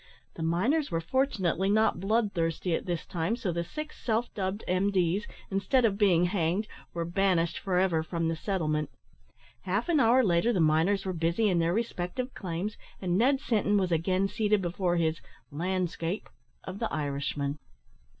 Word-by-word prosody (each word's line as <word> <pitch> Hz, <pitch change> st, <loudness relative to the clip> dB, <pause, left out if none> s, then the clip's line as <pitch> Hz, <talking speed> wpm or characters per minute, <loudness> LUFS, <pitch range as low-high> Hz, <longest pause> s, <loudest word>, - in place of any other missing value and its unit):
The -, -, -8 dB
miners 210 Hz, -, +1 dB
were 165 Hz, -3 st, 0 dB
fortunately 195 Hz, -, 0 dB
not 215 Hz, -3 st, +3 dB
bloodthirsty 190 Hz, -5 st, 0 dB
at -, -, -2 dB
this 175 Hz, -2 st, -2 dB
time, 175 Hz, +6 st, -1 dB
so 210 Hz, -7 st, -2 dB
the 170 Hz, 0 st, -2 dB
six 305 Hz, -, -8 dB
self 230 Hz, +1 st, 0 dB
dubbed 195 Hz, +1 st, -3 dB
M.D.s, 185 Hz, +1 st, +1 dB, 0.2 s
instead 195 Hz, +6 st, +2 dB
of 200 Hz, -2 st, +1 dB
being 180 Hz, -4 st, +4 dB
hanged, 180 Hz, +2 st, 0 dB, 0.2 s
were 170 Hz, -1 st, -3 dB
banished 170 Hz, -2 st, +1 dB
for 185 Hz, -2 st, -1 dB
ever 180 Hz, -3 st, +2 dB
from 165 Hz, +1 st, -2 dB
the 165 Hz, -, 0 dB
settlement. 155 Hz, -5 st, -1 dB, 0.7 s
Half 200 Hz, -, -1 dB
an 320 Hz, -3 st, +4 dB
hour 250 Hz, +1 st, +5 dB
later 180 Hz, +3 st, +3 dB
the 190 Hz, -, 0 dB
miners 165 Hz, +6 st, +3 dB
were 190 Hz, -, -1 dB
busy 170 Hz, +6 st, +1 dB
in 180 Hz, -3 st, +2 dB
their 165 Hz, 0 st, +2 dB
respective 230 Hz, +4 st, -2 dB
claims, 185 Hz, +3 st, -4 dB, 0.2 s
and 180 Hz, -2 st, -1 dB
Ned 260 Hz, +7 st, +3 dB
Sinton 210 Hz, -7 st, +1 dB
was 185 Hz, -3 st, 0 dB
again 185 Hz, +4 st, +1 dB
seated 210 Hz, 0 st, +1 dB
before 175 Hz, 0 st, -1 dB
his 160 Hz, -1 st, 0 dB, 0.3 s
"lan'scape" 180 Hz, +3 st, -2 dB, 0.4 s
of 190 Hz, +2 st, -7 dB
the 230 Hz, -, -2 dB
Irishman. 140 Hz, -1 st, -2 dB
185 Hz, 165 wpm, -29 LUFS, 165-210 Hz, 0.7 s, hour